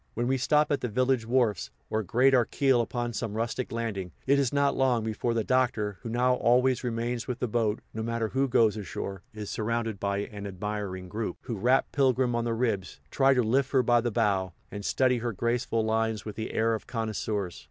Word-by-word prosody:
When 120 - 0
we 135 - +2
stop 150 +3 +3
at 145 - +1
the - - -1
village 125 0 +1
wharfs, 120 -7 +1 0.2
or 110 - +1
grate 125 +7 +3
our 125 -3 +5
keel 135 -2 +2
upon 120 0 -3
some 110 -1 -3
rustic 115 +2 -2
landing, 105 -6 -3
it 140 +1 +4
is 135 -4 +1
not 140 -1 +2
long 125 -4 +2
before 110 +2 -1
the 115 - +1
Doctor, 115 -6 0
who 120 - -6
now 125 +2 +2
always 125 +1 +3
remains 120 0 -2
with 125 - -3
the 125 - -1
boat, 110 -1 0
no 110 - -4
matter 115 0 -1
who 135 +3 +1
goes 115 -4 +3
ashore, 100 -2 -5
is 105 -3 -6
surrounded 115 -1 -2
by 100 -1 -1
an 100 0 -5
admiring 100 -1 -4
group, 105 0 -4
who 115 - -4
rap 125 +6 +3
Pilgrim 130 -3 +2
on 120 0 0
the 115 -1 0
ribs, 105 -7 -2
try 135 0 +4
to 125 - +3
lift 130 +5 +1
her 130 -2 +4
by 120 0 +4
the 120 - -1
bow, 100 -5 0 0.2
and 100 0 -6
study 125 +3 +2
her 120 0 -2
graceful 115 +1 0
lines 110 0 0
with 105 - -6
the 110 - -4
air 115 +1 +1
of 110 - -4
connoisseurs. 110 -5 -3
115 Hz, 215 wpm, -28 LUFS, 105-125 Hz, 0.2 s, our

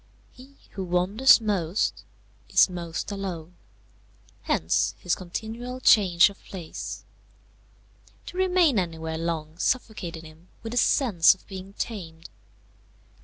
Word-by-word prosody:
He 265 +2 -16 0.2
who 195 - -5
wanders 185 +10 +4
most 200 -4 -1 0.5
is - - +5
most 170 +1 -5
alone; 180 -4 -5 0.9
hence 80 +1 0
his 180 - -1
continual 225 +7 -5
change 195 -6 +5
of 200 - -19
place. 175 -5 -7 1.2
To - - -9
remain 360 - +3
anywhere 160 -2 -4
long 165 -1 -4
suffocated 185 -11 -2
him 160 +2 -15 0.2
with 225 - -5
the 245 - -3
sense 220 - +4
of 190 - -25
being 190 0 -9
tamed. 165 -8 -6
185 Hz, 115 wpm, -26 LUFS, 165-225 Hz, 1.2 s, is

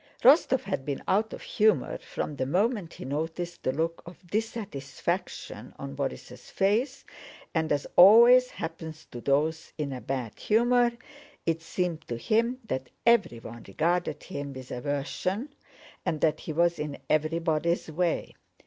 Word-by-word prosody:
Rostóv 265 -1 +6
had 190 -8 -3
been 140 0 -4
out 215 +3 +2
of - - -8
humor 215 0 +2
from 150 - -5
the 130 -1 -2
moment 195 - 0
he - - -8
noticed 160 +5 -3
the 130 - 0
look 165 +4 -2
of 175 +1 -12
dissatisfaction 205 - -4
on 70 0 -7
Borís' 65 - -5
face, 245 +8 0 0.5
and 160 -1 0
as 145 -1 +1
always 235 +7 +8
happens 160 -1 -7
to 120 - -7
those 150 +5 0
in 145 -3 -2
a 125 - -6
bad 130 -5 -4
humor, 240 +2 +3 0.5
it 165 0 0
seemed 170 -1 -2
to 120 - -3
him 230 - +1
that 130 -8 -3 0.2
everyone 120 - +1
regarded 170 - 0
him 145 -6 -6
with 130 -1 -9
aversion 150 - -2 0.5
and 155 - -1
that 155 -1 +2
he - - -6
was 170 +2 +2
in 150 -1 -4
everybody's 160 +1 0
way. 170 +1 -1
165 Hz, 145 wpm, -28 LUFS, 145-210 Hz, 0.5 s, always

